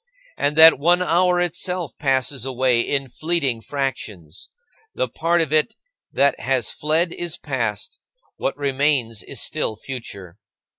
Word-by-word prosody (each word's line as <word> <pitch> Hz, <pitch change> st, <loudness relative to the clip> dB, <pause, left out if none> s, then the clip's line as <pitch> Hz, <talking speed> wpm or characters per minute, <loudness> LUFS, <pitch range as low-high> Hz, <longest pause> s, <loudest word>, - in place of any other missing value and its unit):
And 145 Hz, +1 st, 0 dB
that 160 Hz, -2 st, +8 dB
one 175 Hz, +4 st, +3 dB
hour 180 Hz, +1 st, +2 dB
itself 175 Hz, -3 st, -2 dB
passes 135 Hz, -2 st, 0 dB
away 130 Hz, -2 st, +1 dB
in 140 Hz, +2 st, -1 dB
fleeting 140 Hz, -3 st, -1 dB
fractions. 110 Hz, -, -5 dB, 0.5 s
The -, -, 0 dB
part 170 Hz, +1 st, 0 dB
of 155 Hz, -2 st, -2 dB
it 155 Hz, +9 st, +2 dB, 0.4 s
that 140 Hz, +1 st, +2 dB
has 130 Hz, -4 st, 0 dB
fled 160 Hz, +3 st, 0 dB
is 175 Hz, -2 st, -4 dB
past; 115 Hz, -8 st, -4 dB, 0.4 s
what -, -, -2 dB
remains 135 Hz, -6 st, 0 dB
is -, -, -6 dB
still 110 Hz, -, -1 dB
future. 100 Hz, -8 st, -8 dB
140 Hz, 135 wpm, -21 LUFS, 125-165 Hz, 0.5 s, that